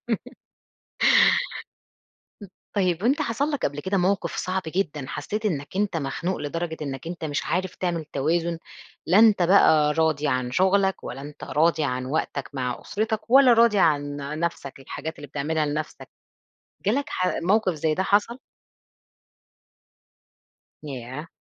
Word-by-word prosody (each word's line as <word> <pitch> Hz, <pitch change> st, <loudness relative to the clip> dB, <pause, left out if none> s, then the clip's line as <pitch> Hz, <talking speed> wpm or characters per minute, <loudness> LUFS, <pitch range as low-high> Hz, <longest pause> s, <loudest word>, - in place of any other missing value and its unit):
م -, -, +4 dB, 2.6 s
طيب 185 Hz, -3 st, +1 dB
وأنت 275 Hz, +7 st, +2 dB
حصل 275 Hz, +3 st, -1 dB
لك 290 Hz, -3 st, 0 dB
قبل 145 Hz, +1 st, -5 dB
كده 190 Hz, +4 st, -1 dB
موقف 195 Hz, +3 st, 0 dB
صعب 185 Hz, 0 st, -2 dB
جدًا، 155 Hz, -5 st, -2 dB
حسيت 210 Hz, +9 st, -3 dB
إنك 150 Hz, -1 st, -3 dB
أنت 200 Hz, -4 st, 0 dB
مخنوق 165 Hz, +5 st, -2 dB
لدرجة 160 Hz, +2 st, -4 dB
إنك 135 Hz, +1 st, -5 dB
أنت 170 Hz, -1 st, -6 dB
مش 150 Hz, 0 st, -2 dB
عارف 185 Hz, +1 st, -2 dB
تعمل 170 Hz, -3 st, -2 dB
توازن، 165 Hz, +4 st, -1 dB, 0.5 s
لا 185 Hz, +5 st, +4 dB
أنت 215 Hz, -5 st, +6 dB
بقي 160 Hz, -5 st, +5 dB
راضي 155 Hz, -2 st, +1 dB
عن 125 Hz, -1 st, -1 dB
شغلك 190 Hz, +4 st, +2 dB
ولا 135 Hz, -, -6 dB
أنت 145 Hz, +1 st, -9 dB
راضي 160 Hz, 0 st, +2 dB
عن 130 Hz, -1 st, -2 dB
وقتك 140 Hz, -1 st, -2 dB
مع 125 Hz, -3 st, -3 dB
أسرتك 220 Hz, +1 st, -3 dB
ولا 265 Hz, -1 st, +7 dB
راضي 230 Hz, -2 st, +4 dB
عن 145 Hz, -4 st, +2 dB, 0.2 s
نفسك، 140 Hz, -5 st, -4 dB
الحاجات 160 Hz, +4 st, -6 dB
اللي 145 Hz, -, -9 dB
بتعملها 150 Hz, +2 st, -1 dB
لنفسك، 150 Hz, +1 st, -5 dB, 0.8 s
جالك 270 Hz, +8 st, +2 dB
ح 185 Hz, 0 st, -1 dB
موقف 190 Hz, 0 st, +2 dB
زي 155 Hz, +1 st, 0 dB
ده 185 Hz, -, 0 dB
حصل؟ 205 Hz, +5 st, +1 dB, 2.5 s
ياه! 135 Hz, +1 st, -7 dB
165 Hz, 135 wpm, -24 LUFS, 145-200 Hz, 2.6 s, ولا